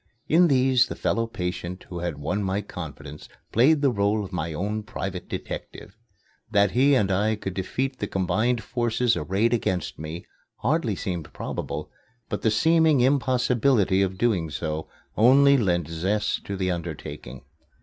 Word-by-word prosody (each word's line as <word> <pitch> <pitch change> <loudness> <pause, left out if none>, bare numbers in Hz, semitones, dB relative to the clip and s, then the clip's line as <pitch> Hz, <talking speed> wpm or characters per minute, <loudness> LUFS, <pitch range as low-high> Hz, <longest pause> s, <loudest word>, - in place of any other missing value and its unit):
In 175 +3 +5
these 130 -3 +4
the - - -6
fellow 115 0 0
patient 90 -3 -5
who 90 - -5
had 85 -4 -3
won 80 +8 -2
my 95 +1 -1
confidence 75 -6 -9 0.2
played 140 +6 +4
the 140 - +4
role 100 -1 +1
of 95 - -11
my 85 -2 -2
own 105 +7 -2
private 95 -3 -6
detective. - - -7 0.5
That 100 -1 +3
he 135 +3 +4
and 100 -6 +2
I 105 +3 +2
could 95 -3 -5
defeat 130 +8 -3
the 105 - -2
combined 110 +6 0
forces 120 0 0
arrayed 105 +6 0
against 95 -9 -1
me 80 +3 -6 0.3
hardly 125 -4 0
seemed 90 -4 -4
probable, - - -5 0.4
but - - -3
the 110 - +3
seeming 160 +5 +4
impossibility 125 -6 +2
of 95 -1 +1
so - - -14
doing 90 -10 +1 0.6
only 140 +5 +6
lent 90 - +1
zest 95 +6 -1
to 100 - -4
the 95 -1 0
undertaking. 80 -6 -6
105 Hz, 155 wpm, -25 LUFS, 90-125 Hz, 0.6 s, only